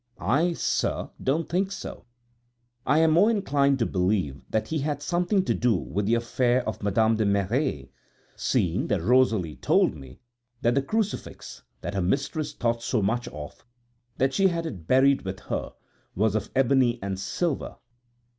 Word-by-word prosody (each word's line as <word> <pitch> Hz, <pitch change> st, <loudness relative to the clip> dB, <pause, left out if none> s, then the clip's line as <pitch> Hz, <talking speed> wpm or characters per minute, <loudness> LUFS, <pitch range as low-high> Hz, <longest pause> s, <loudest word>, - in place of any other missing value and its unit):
I, 155 Hz, -, +1 dB
sir, -, -, -1 dB
don't 155 Hz, +5 st, 0 dB
think 190 Hz, +3 st, 0 dB
so; 195 Hz, -, -7 dB, 0.8 s
I 145 Hz, -, +4 dB
am 160 Hz, 0 st, +4 dB
more 185 Hz, +8 st, +5 dB
inclined 140 Hz, -11 st, +2 dB
to 115 Hz, -, +1 dB
believe 90 Hz, -, 0 dB
that 110 Hz, -, -1 dB
he 160 Hz, -, -1 dB
had 145 Hz, 0 st, -2 dB
something 180 Hz, +4 st, +1 dB
to -, -, +1 dB
do 120 Hz, -3 st, +2 dB
with 100 Hz, +2 st, -2 dB
the 115 Hz, -, +3 dB
affair 120 Hz, +1 st, +1 dB
of 110 Hz, -, -4 dB
Madame 110 Hz, +2 st, +2 dB
de 110 Hz, -, +1 dB
Merret, 100 Hz, -, 0 dB, 0.4 s
seeing 90 Hz, 0 st, 0 dB
that 95 Hz, -5 st, 0 dB
Rosalie 110 Hz, -8 st, +2 dB
told -, -, +2 dB
me 65 Hz, -4 st, -12 dB, 0.4 s
that 120 Hz, -, +3 dB
the 140 Hz, -, +2 dB
crucifix, 210 Hz, +8 st, -4 dB, 0.2 s
that -, -, -4 dB
her 95 Hz, -, -1 dB
mistress 140 Hz, -, -1 dB
thought 115 Hz, -1 st, -1 dB
so 115 Hz, -3 st, 0 dB
much 120 Hz, +5 st, 0 dB
of, 75 Hz, -1 st, -9 dB, 0.5 s
that 135 Hz, +1 st, +1 dB
she 195 Hz, +5 st, +4 dB
had 170 Hz, -2 st, -2 dB
it 90 Hz, -, -7 dB
buried 135 Hz, +1 st, +4 dB
with 95 Hz, -1 st, -5 dB
her, -, -, -4 dB, 0.4 s
was 105 Hz, +2 st, +2 dB
of 110 Hz, 0 st, -2 dB
ebony 130 Hz, -2 st, +3 dB
and 95 Hz, -1 st, -3 dB
silver. 160 Hz, -, -2 dB
120 Hz, 165 wpm, -26 LUFS, 100-145 Hz, 0.8 s, more